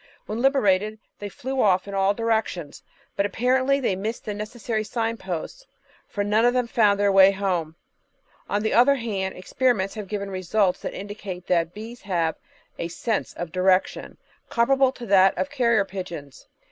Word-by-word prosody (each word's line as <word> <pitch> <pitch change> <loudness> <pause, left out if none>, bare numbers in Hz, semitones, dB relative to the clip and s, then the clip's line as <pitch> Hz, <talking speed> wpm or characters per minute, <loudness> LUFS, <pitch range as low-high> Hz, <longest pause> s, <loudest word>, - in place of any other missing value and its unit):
When 220 +3 -4
liberated 215 -6 +2 0.2
they 205 - -5
flew 260 +6 -3
off 190 -2 +3
in 200 - -7
all 195 +1 +2
directions, 220 -9 -2 0.3
but 200 - +1
apparently 260 +6 +1
they 240 -8 0
missed 215 +5 -4
the 210 - -3
necessary 215 +1 -3
signposts, 225 - -4 0.4
for 205 - -2
none 210 +2 +2
of 245 +1 +3
them 250 -1 +2
found 215 -4 +2
their 205 -1 +3
way 195 0 +7
home. 185 -5 -2 0.7
On 205 +1 0
the 220 - 0
other 255 +4 +5
hand, 200 -7 -3
experiments 195 0 0
have 210 -2 -6
given 200 -1 -4
results 185 +1 0
that - - -5
indicate 195 -3 -7
that 170 -1 0
bees 225 +3 -9
have 170 -6 -1 0.4
a 170 - -2
"sense 215 +5 -2
of 175 -2 -6
direction," 185 +1 +1 0.3
comparable 265 +3 +3
to 245 -2 -9
that 190 -2 +4
of 280 - -2
carrier 235 -7 +2
pigeons. 170 -8 -8
205 Hz, 165 wpm, -24 LUFS, 190-235 Hz, 0.7 s, way